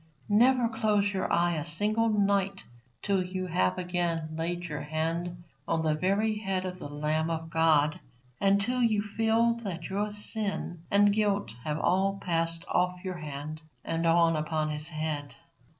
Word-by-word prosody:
Never 240 +3 +4
close 210 -3 +1
your 190 - -1
eye 170 -1 +2
a 150 - -2
single 210 +8 +1
night 200 -2 +1 0.4
till 195 -2 +2
you 185 +1 -4
have 95 - +1
again 175 -3 -1
laid 175 +2 -2
your 150 -4 -4
hand 165 +3 -3 0.2
on 165 -1 0
the 155 -1 +2
very 200 +6 +1
head 190 -3 -1
of 185 0 -5
the 145 - -7
Lamb 155 +2 -1
of 165 0 -4
God, 155 -2 +3 0.4
and 200 0 +4
till 250 +5 0
you 215 -3 +2
feel 225 +2 +2
that 175 -5 -5
your 205 +2 0
sin 205 -4 -3
and 205 0 +5
guilt 205 -1 +1
have 150 -1 -1
all 195 +4 +1
passed 165 -2 -1
off 180 0 0
your 185 -2 -4
hand 155 0 -6 0.2
and 165 0 0
on 165 0 +4
upon 155 0 -1
His 150 +2 -3
head. 155 -4 -3
175 Hz, 165 wpm, -29 LUFS, 160-205 Hz, 0.4 s, and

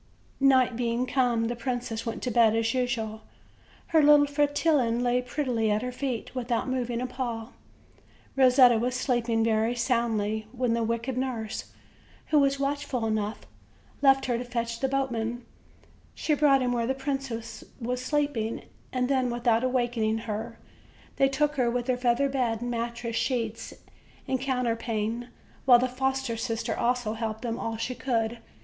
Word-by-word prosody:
Night 260 -3 +4
being 240 +1 0
come, 245 -3 +1
the 240 +1 -2
princess 240 -2 -3
went 230 - -4
to 250 - -1
bed 225 -1 +4
as 225 0 +1
usual; 230 -4 -2 0.7
her 320 -1 +5
little 295 0 +7
Fretillon 285 -4 +1
lay 245 0 +2
prettily 245 -4 -1
at 210 +2 +1
her 250 - -3
feet, 250 -2 -4
without 245 -2 -1
mov 255 -2 -1
ing 240 0 -2
a - - -1
paw. 240 -3 -4 0.9
Kosetta 255 -3 +6
was 250 +2 -1
sleeping 240 -3 +1
very 225 +1 +1
soundly, 225 -3 0
when 250 -2 0
the 235 - 0
wicked 230 +3 -1
nurse, 240 -4 -3 0.6
who 305 - +5
was 275 0 +2
watchful 275 -3 -1
enough, 215 -1 -1 0.6
left 270 -1 +5
her 240 -2 0
to - - -3
fetch 235 -1 -3
the 270 - +1
boatman. 240 -3 -2 0.7
She 310 - 0
brought 280 -3 +4
him 250 - 0
where 235 -1 0
the 265 - 0
princess 270 -4 -4 0.2
was 250 +1 -3
sleeping; 285 -6 -1 0.3
and 250 -1 0
then, 260 -2 +1
without 235 -1 +1
awakening 240 -4 0
her, 225 +2 -4 0.6
they 270 - +4
took 295 +2 0
her 245 -2 +2
with 245 0 -1
her 255 -1 +1
feather 250 +2 +2
bed, 245 -4 -1
mattress, 235 -1 -3
sheets 230 -3 -2 0.6
and 260 -1 -1
coun 260 -2 0
terpane, 230 0 -2 0.4
while 250 -2 +8
the 250 +1 +1
foster 265 -1 -1
sister 225 0 -2
also 245 -2 0
helped 220 0 -4
them 230 -1 -3
all 225 -1 -3
she 240 +3 -3
could. 235 -3 -1
245 Hz, 160 wpm, -27 LUFS, 230-260 Hz, 0.9 s, while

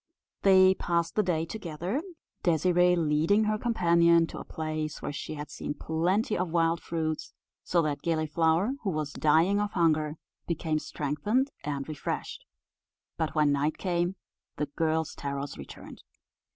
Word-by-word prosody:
They 190 -1 +6
passed 170 -2 -1
the 215 - +3
day 170 -5 0
together, 180 - -4 0.4
Désirée 180 +1 +3
leading 165 +6 +3
her 215 0 0
companion 170 -7 +4
to - - -8
a - - -6
place 155 -1 -4
where - - -4
she 150 - -5
had 150 0 -7
seen 145 - -5
plenty 180 +9 0
of 180 0 -1
wild 165 0 +1
fruits; 160 -2 -3 0.3
so 170 -2 +2
that 145 -2 -2
Gilliflower, 165 - +1
who 205 - -1
was 155 -4 -2
dying 165 +7 +3
of 210 0 -2
hunger, 155 -3 +2 0.3
became 160 -2 -1
strengthened 210 - -1
and 140 -1 -3
refreshed. 155 -2 -4 0.7
But 160 0 -2
when 150 -2 +4
night 145 +2 0
came, 175 0 -1 0.4
the 150 - 0
girl's 160 -1 0
terrors 140 0 -4
returned. - - -11
165 Hz, 145 wpm, -28 LUFS, 155-180 Hz, 0.7 s, They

